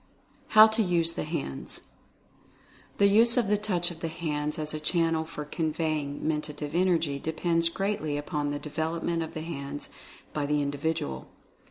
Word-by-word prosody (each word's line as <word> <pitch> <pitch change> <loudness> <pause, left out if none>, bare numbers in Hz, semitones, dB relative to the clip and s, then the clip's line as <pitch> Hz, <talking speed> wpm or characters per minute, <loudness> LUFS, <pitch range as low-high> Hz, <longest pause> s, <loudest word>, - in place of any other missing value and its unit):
HOW 215 - +12
TO 220 +1 +1
USE 170 -4 +2
THE - - -3
HANDS. 150 - -5 1.2
The 200 - +5
use 230 +4 +5
of 240 - +4
the 205 +1 +2
Touch 185 -4 0
of 165 - -10
the 165 - -2
hands 150 -2 -2
as 155 -1 -3
a 155 - -3
channel 165 0 +1
for 150 -2 -6
conveying 155 -2 -2
Mentative 150 -1 -3
Energy 170 -5 +2
depends 165 +2 +1
greatly 170 -5 -1
upon 145 -1 -2
the 145 - -2
development 160 +3 -2
of 165 +1 -5
the 155 - -3
hands 145 -3 -6 0.4
by 145 -1 -1
the 150 0 +2
individual. 140 - -2
160 Hz, 160 wpm, -28 LUFS, 150-175 Hz, 1.2 s, HOW